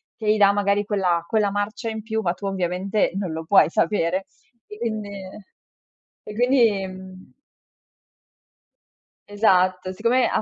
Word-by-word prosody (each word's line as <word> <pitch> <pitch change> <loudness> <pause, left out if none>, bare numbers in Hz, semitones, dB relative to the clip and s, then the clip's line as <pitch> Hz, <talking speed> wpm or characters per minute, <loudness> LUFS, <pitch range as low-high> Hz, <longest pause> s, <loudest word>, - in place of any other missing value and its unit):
che 215 -2 0
gli 215 - +2
dà 200 -1 +6
magari 205 0 +1
quella 180 -5 0
quella 210 -2 +1
marcia 205 +3 -3
in 220 -1 -6
più, 220 0 -2
ma 175 -3 0
tu, 200 +2 -9
ovviamente, 190 +1 -1
non 190 -4 -3
lo 160 0 -5
puoi 180 -4 +5
sapere. 185 +1 0 0.4
E 210 - -11
quindi 215 -3 -3 1.1
e 210 - -9
quindi, 235 -5 +2
mhmm 185 0 -12 2.0
Esatto. 185 -3 +2
Siccome 235 +5 +2
ha - - 0
200 Hz, 140 wpm, -23 LUFS, 185-215 Hz, 2.0 s, dà